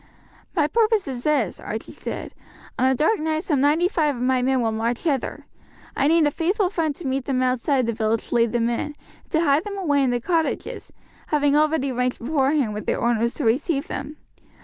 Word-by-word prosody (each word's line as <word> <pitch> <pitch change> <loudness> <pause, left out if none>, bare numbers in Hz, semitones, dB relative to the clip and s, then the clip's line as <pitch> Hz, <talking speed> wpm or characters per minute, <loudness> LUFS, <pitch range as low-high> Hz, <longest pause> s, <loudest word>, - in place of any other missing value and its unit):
"My 310 -5 +3
purpose 440 +3 +2
is 255 -3 -4
this," 300 -1 +1
Archie - - -6
said. - - -6 0.5
"On 260 - +4
a 265 - +2
dark 320 - +2
night 315 +1 -1
some 295 -8 +1
ninety 305 +5 +3
five 305 -6 0
of 240 - -7
my 255 0 +2
men 260 +1 +2
will 230 -2 +1
march 230 +2 -2
hither; 285 -7 -2 0.5
I 280 - +2
need 325 0 +4
a 295 - +2
faithful 365 +5 0
friend 315 -6 -1
to 345 - -10
meet 265 -1 -1
them 255 -2 0
outside 255 +1 +1
the 230 - -1
village 220 0 -1
to - - -4
lead 230 -1 +3
them 235 -1 +1
in, 235 0 0
and 295 -1 -5 0.3
to 320 - +1
hide 290 -1 +3
them 405 -1 -6
away 295 -7 +1
in 265 - +2
the 245 0 0
cottages, 325 +4 -2 0.4
having 290 -1 +2
already 300 -2 +2
arranged 250 0 -1
beforehand 270 -2 +1
with 210 - -6
their - - 0
owners 235 0 +1
to 290 - -3
receive 275 +5 +1
them. 295 +2 -5
280 Hz, 215 wpm, -23 LUFS, 245-315 Hz, 0.5 s, On